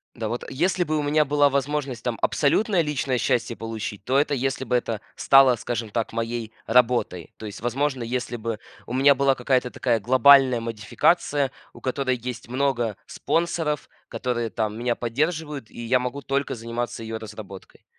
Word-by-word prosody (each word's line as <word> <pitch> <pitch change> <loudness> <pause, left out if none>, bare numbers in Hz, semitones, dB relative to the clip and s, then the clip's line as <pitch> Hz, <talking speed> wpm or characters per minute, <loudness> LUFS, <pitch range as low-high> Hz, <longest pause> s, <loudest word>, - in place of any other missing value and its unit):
Да, 110 -2 -3
вот 120 +2 -3
если 175 +6 +1
бы 155 -1 -1
у 150 - 0
меня 150 +1 +3
была 145 0 +4
возможность 140 -2 -2
там 120 -2 -2
абсолютное 185 +5 +2
личное 140 -4 -1
счастье 120 -2 0
получить, 110 -3 -6
то 130 +4 +1
это 145 0 +1
если 135 0 -1
бы 125 -1 0
это 115 -3 -1 0.2
стало, 135 -2 +6
скажем 115 -1 -3
так, 115 +1 -2
моей 115 0 -3
работой. 115 -8 +2
То 110 - -9
есть, 105 0 -8
возможно, 130 +2 -1
если 125 +1 -3
бы 115 -1 -3 0.3
у - - -6
меня 140 +2 +6
была 135 0 +2
какая-то 125 0 +1
такая 120 -2 0
глобальная 130 +2 +6
модификация, 130 +5 +1 0.2
у - - -14
которой 130 -1 -1
есть 125 0 -6
много 120 -4 0
спонсоров, 165 -3 -1 0.2
которые 120 -3 -2
там 110 -1 -2
меня 120 0 0
поддерживают, 150 +2 -2
и 120 - -9
я 125 +2 +3
могу 125 +3 -4
только 140 -1 -1
заниматься 115 0 -4
её 110 0 -5
разработкой. 105 -3 -11
125 Hz, 170 wpm, -24 LUFS, 115-140 Hz, 0.3 s, стало